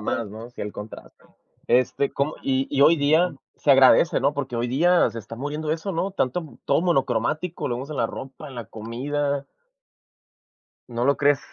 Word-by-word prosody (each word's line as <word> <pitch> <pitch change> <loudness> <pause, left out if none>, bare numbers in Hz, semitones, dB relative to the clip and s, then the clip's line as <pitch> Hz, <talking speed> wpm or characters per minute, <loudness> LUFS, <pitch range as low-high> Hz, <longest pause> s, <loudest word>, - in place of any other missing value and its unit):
más, 105 0 -2
¿no? 110 +3 -9
Sí, - - -11
el 105 - -4
contraste. 105 +1 -11 0.4
Este, 130 +2 +2
como 140 +3 -1
y 135 0 0
y 140 -1 0
hoy 165 +3 +7
día 155 +3 +2 0.2
se 145 - +3
agradece, 135 +5 +6
¿no? 140 +1 +2
Porque 135 -4 -4
hoy 120 +1 -1
día 175 +8 +3
se 115 - -6
está 115 +2 -9
muriendo 150 +4 -3
eso, 165 +5 -2
¿no? 185 +3 -2
Tanto 160 -1 -2
todo 140 +3 +2
monocromático, 160 +1 0
lo 120 - -2
vemos 130 +4 -6
en 150 - -5
la 115 - +1
ropa, 135 +5 -9
en 130 - -11
la 120 -3 -6
comida. 140 +6 -3 1.4
¿No 120 0 -2
lo 140 +1 +3
crees? 145 0 +4
140 Hz, 185 wpm, -24 LUFS, 120-155 Hz, 1.4 s, hoy